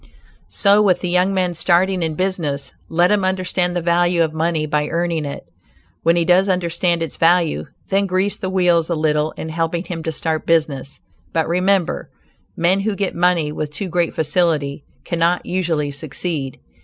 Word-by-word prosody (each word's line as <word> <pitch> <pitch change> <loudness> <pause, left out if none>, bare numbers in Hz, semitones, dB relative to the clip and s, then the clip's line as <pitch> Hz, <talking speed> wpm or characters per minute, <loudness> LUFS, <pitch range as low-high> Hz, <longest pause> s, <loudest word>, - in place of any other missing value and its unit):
So 205 0 +4
with 185 -4 +3
the 180 - -2
young 180 +2 +2
man 185 -2 0
starting 180 +2 +2
in 160 -2 -1
business; 165 -6 -2 0.2
let 175 +3 +3
him 205 -2 +2
understand 185 -1 0
the 175 - -1
value 175 0 +2
of 160 -1 -2
money 160 -1 0
by 150 0 0
earning 170 -2 -1
it. 140 - -6 0.6
When 165 +1 +3
he 170 -1 +1
does 185 +3 +4
understand 170 -1 0
its 160 - -6
value, 170 -1 +2 0.2
then 195 0 +2
grease 190 +2 0
the 190 - -4
wheels 175 -3 +2
a 170 - 0
little 155 -1 +1
in 160 - -6
helping 165 +1 -1
him 175 -3 -5
to 160 - -3
start 160 0 -2
business, 150 -4 0 0.3
but 160 -1 +1
remember, 180 +1 0 0.5
men 175 +3 +2
who 205 +1 -1
get 195 -1 -2
money 170 -3 +1
with 150 0 -4
too 185 +6 -5
great 175 -1 0
facility 150 -3 0 0.2
cannot 170 +1 0
usually 165 -5 -1
succeed. 140 -1 -4
170 Hz, 175 wpm, -19 LUFS, 160-180 Hz, 0.6 s, So